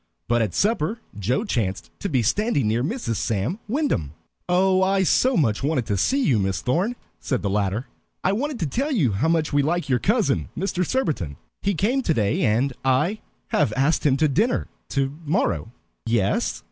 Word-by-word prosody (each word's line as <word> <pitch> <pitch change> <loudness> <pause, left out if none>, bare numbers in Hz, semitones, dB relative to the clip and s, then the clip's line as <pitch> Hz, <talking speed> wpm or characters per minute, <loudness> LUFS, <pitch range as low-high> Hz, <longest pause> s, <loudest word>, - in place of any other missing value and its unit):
But 120 0 +2
at 105 -5 -1
supper 210 -1 +1 0.2
Joe 125 - 0
chanced 110 - -2
to 200 - -3
be 130 -7 +1
standing 145 - +1
near 115 +3 +1
Mrs. 145 - -2
Sam 115 - -1
Wyndham. 210 - -1 0.3
"Oh, 185 +1 +3
I 190 0 +3
so 255 +7 +3
much 115 -9 +1
wanted 140 -4 0
to 100 - -1
see 270 - +1
you, 125 - +3
Miss 95 -1 0
Thorn," 180 - 0 0.2
said 130 -6 -2
the 100 - 0
latter. 105 +4 0 0.4
"I 185 - +3
wanted 265 +6 -2
to - - +1
tell 270 - -1
you 165 - +2
how 100 +11 0
much 160 -3 +1
we 145 - +4
like 160 +1 -1
your 125 -2 +3
cousin, 210 - +1
Mr. 185 0 -1
Surbiton. 145 - -1 0.2
He 200 -1 0
came 235 - +1
today, 115 - +1
and 120 +6 +2
I 150 +11 +2 0.3
have 145 -8 +2
asked 140 +5 +2
him 140 -3 +3
to 155 - +3
dinner 210 - +1 0.2
to 135 0 -1
morrow." 140 - 0 0.4
"Yes?" 110 -4 +1
145 Hz, 185 wpm, -23 LUFS, -, 0.4 s, we